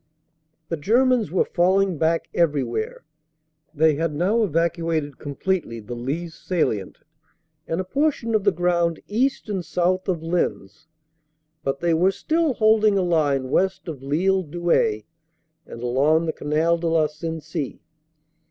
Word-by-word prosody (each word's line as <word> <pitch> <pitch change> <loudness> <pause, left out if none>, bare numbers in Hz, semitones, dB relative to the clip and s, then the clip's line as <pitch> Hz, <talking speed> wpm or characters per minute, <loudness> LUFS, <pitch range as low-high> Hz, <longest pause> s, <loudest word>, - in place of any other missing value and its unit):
"The 165 - -2
Germans 240 - +2
were 180 - +1
falling 185 -1 +2
back 165 +1 +1
everywhere; 130 -9 -1 0.7
they 160 0 +3
had 155 +1 -2
now 195 +9 +2
evacuated 165 - -1
completely 145 -3 -2
the 110 +2 -8
Lys 150 +8 -4
salient 130 - -2 0.7
and 165 - -2
a - - 0
portion 270 +1 0
of 215 -2 +2
the 200 - +4
ground 170 -1 +1
east 255 +6 0
and 195 -4 -2
south 185 +3 0
of 170 -3 -1
Lens, 155 - -2 0.8
but 135 0 -2
they 170 -1 +2
were 175 +4 +4
still 310 - 0
holding 215 -2 +4
a 190 - +2
line 145 -6 +1
west 190 0 0
of 150 -6 -6
Lille 180 +8 +1
Douai 170 -9 0 0.7
and 115 - -9
along 145 +7 +2
the 160 - -1
Canal 160 +3 +1
de 170 - -2
la 165 -1 +3
Sensee. 155 -1 -5
165 Hz, 140 wpm, -23 LUFS, 150-190 Hz, 0.8 s, the